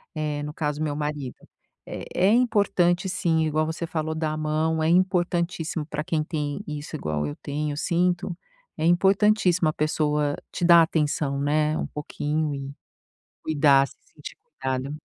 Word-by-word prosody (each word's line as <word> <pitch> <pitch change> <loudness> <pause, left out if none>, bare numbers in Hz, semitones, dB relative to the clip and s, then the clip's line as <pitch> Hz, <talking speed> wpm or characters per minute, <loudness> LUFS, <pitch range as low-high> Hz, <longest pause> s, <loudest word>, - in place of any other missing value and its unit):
eh, 150 -1 -2
no 150 - -5
caso, 150 -1 -2
meu 150 -2 -2
marido 150 -3 -4 0.5
é - - -6
é 185 - +3
importante, 200 -6 +2
sim. 160 -3 +1
Igual 155 0 +1
você 160 +1 -4
falou, 160 -1 -2
dá 160 -1 -1
a 155 - -4
mão, 155 +1 0
é 155 - +2
importantíssimo 175 -3 +1
para 150 -1 -3
quem 155 -1 -1
tem 150 +2 -3
isso 150 +1 -6
igual 75 - -2
eu 75 - -5
tenho, 150 +1 -3
eu - - -7
sinto 175 +2 0 0.4
é 160 - -1
importantíssimo 185 -1 +3
a 155 - -2
pessoa 150 -1 0 0.2
te - - -4
dar 170 -1 +8
atenção, 150 -3 0
né, 150 +1 +1
um - - -2
pouquinho 150 +1 -2
e 135 0 -6 0.7
cuidar, 140 -3 +4
se - - -17 0.2
sentir - - -10 0.2
cuidado. 130 +2 -2
155 Hz, 165 wpm, -25 LUFS, 150-170 Hz, 0.7 s, dar